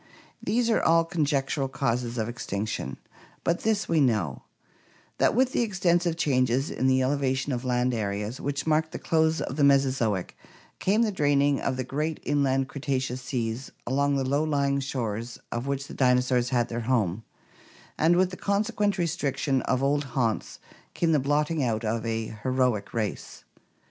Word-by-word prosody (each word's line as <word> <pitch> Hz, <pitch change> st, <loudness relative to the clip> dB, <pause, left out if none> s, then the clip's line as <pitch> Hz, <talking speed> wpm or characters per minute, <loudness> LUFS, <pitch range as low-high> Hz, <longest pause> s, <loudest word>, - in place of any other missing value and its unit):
These 235 Hz, +1 st, +1 dB
are -, -, +3 dB
all 165 Hz, +1 st, +4 dB
conjectural 145 Hz, -4 st, 0 dB
causes 125 Hz, -2 st, -2 dB
of 110 Hz, -1 st, -1 dB
extinction; 105 Hz, -, -4 dB, 0.5 s
but 170 Hz, +1 st, +1 dB
this 220 Hz, -2 st, 0 dB
we 160 Hz, -2 st, +2 dB
know, 105 Hz, -, +1 dB, 0.8 s
that -, -, +3 dB
with 260 Hz, +1 st, +3 dB
the -, -, +1 dB
extensive 175 Hz, -6 st, +1 dB
changes 130 Hz, -2 st, +1 dB
in 130 Hz, -, 0 dB
the 130 Hz, 0 st, +3 dB
elevation 135 Hz, 0 st, 0 dB
of 120 Hz, 0 st, -3 dB
land 125 Hz, 0 st, +1 dB
areas 105 Hz, +2 st, -3 dB
which 140 Hz, 0 st, -2 dB
marked 155 Hz, 0 st, +1 dB
the -, -, -3 dB
close 160 Hz, 0 st, +1 dB
of 135 Hz, -, -4 dB
the 145 Hz, -, +2 dB
Mesozoic 130 Hz, -9 st, +2 dB, 0.4 s
came 210 Hz, +5 st, +2 dB
the 220 Hz, -, +1 dB
draining 145 Hz, -5 st, +2 dB
of 130 Hz, -2 st, -1 dB
the 130 Hz, -, -1 dB
great 150 Hz, +5 st, -2 dB
inland 135 Hz, -2 st, +1 dB
Cretaceous 130 Hz, -3 st, -2 dB
seas 125 Hz, -1 st, -3 dB
along 140 Hz, +2 st, +1 dB
the 135 Hz, -1 st, 0 dB
low 140 Hz, +3 st, +1 dB
lying 140 Hz, -2 st, +1 dB
shores 120 Hz, -4 st, -3 dB
of 120 Hz, +3 st, -3 dB
which 140 Hz, 0 st, -2 dB
the -, -, -10 dB
dinosaurs 125 Hz, -1 st, +2 dB
had 120 Hz, -2 st, +1 dB
their 120 Hz, 0 st, -4 dB
home, 110 Hz, -5 st, +1 dB, 0.7 s
and 165 Hz, +3 st, +3 dB
with 185 Hz, +1 st, +2 dB
the 185 Hz, -, -7 dB
consequent 205 Hz, 0 st, 0 dB
restriction 150 Hz, -5 st, 0 dB
of 130 Hz, +1 st, +1 dB
old 145 Hz, +1 st, +2 dB
haunts 115 Hz, -4 st, 0 dB, 0.4 s
came 170 Hz, -1 st, +1 dB
the 155 Hz, -, +4 dB
blotting 150 Hz, +2 st, +1 dB
out 115 Hz, -2 st, -1 dB
of 110 Hz, +1 st, -1 dB
a 110 Hz, -1 st, -3 dB
heroic 125 Hz, -5 st, 0 dB
race. 110 Hz, -3 st, -4 dB
135 Hz, 165 wpm, -27 LUFS, 125-155 Hz, 0.8 s, all